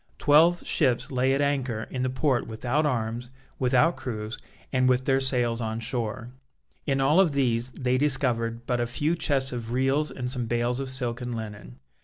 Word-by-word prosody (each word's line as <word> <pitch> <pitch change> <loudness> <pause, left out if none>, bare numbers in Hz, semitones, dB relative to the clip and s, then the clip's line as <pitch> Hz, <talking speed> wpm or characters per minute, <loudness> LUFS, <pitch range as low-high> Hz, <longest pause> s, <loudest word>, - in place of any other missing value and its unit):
Twelve 165 +4 +4
ships 130 -6 +1
lay 130 0 +2
at 140 - 0
anchor 135 -6 -1
in 130 - -3
the 130 - 0
port 130 -1 0
without 125 +7 0
arms, 120 -2 -2 0.3
without 130 +6 +3
crews, 110 -3 -5 0.3
and 130 0 +3
with 130 0 +2
their 135 -1 +3
sails 120 -3 0
on 110 0 -3
shore. 120 0 -3 0.6
In 135 -1 +1
all 145 +6 +4
of 175 -6 +4
these 125 -3 +1
they 130 -1 0
discovered 120 -5 +1
but 125 -1 0
a 120 - 0
few 150 +7 0
chests 135 -5 0
of 120 -1 -5
reals 135 +4 +1
and 125 -1 -5
some 125 -3 -3
bales 120 +2 0
of 135 -1 -3
silk 125 -2 -2
and 120 -1 -4
linen. 105 - -8
125 Hz, 185 wpm, -26 LUFS, 120-135 Hz, 0.6 s, Twelve